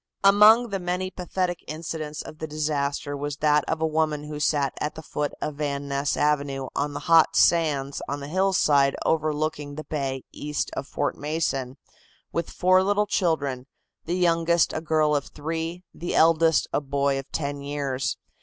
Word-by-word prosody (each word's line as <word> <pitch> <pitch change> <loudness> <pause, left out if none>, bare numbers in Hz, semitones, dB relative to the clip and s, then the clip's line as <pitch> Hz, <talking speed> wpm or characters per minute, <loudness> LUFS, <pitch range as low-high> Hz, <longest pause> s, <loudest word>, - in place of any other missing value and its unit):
Among 210 +4 +7
the 195 -1 -2
many 180 +1 -2
pathetic 180 -1 -3
incidents 155 -1 -5
of 155 - -11
the 160 - -4
disaster 145 -2 -2
was 145 0 -4
that 150 0 +3
of 160 - -2
a - - +3
woman 155 -1 0
who 150 0 -6
sat 145 -2 +1
at 150 +1 -3
the 160 - -8
foot 150 -1 -2
of 150 -2 -4
Van 140 -1 -2
Ness 140 0 -1
Avenue 140 -3 0
on 145 0 -1
the - - -4
hot 165 -1 +5
sands 145 -5 +2
on 140 +1 -2
the 140 - -7
hillside 155 -6 +3
overlooking 155 -2 -1
the 155 - -6
bay 135 -4 -3
east 150 0 -3
of 135 - -4
Fort 145 - -2
Mason, 140 -4 -2 0.5
with 170 -1 -2
four 185 +1 +3
little 205 +2 +2
children, 145 -10 -1 0.4
the 170 - -1
youngest 170 -1 +2
a 155 - -2
girl 155 -2 +2
of 145 - -1
three, 165 +3 -4
the 175 - -4
eldest 165 -1 +4
a - - +1
boy 140 0 0
of 135 - -10
ten 145 -2 -3
years. 140 -2 -2
150 Hz, 175 wpm, -25 LUFS, 145-165 Hz, 0.5 s, Among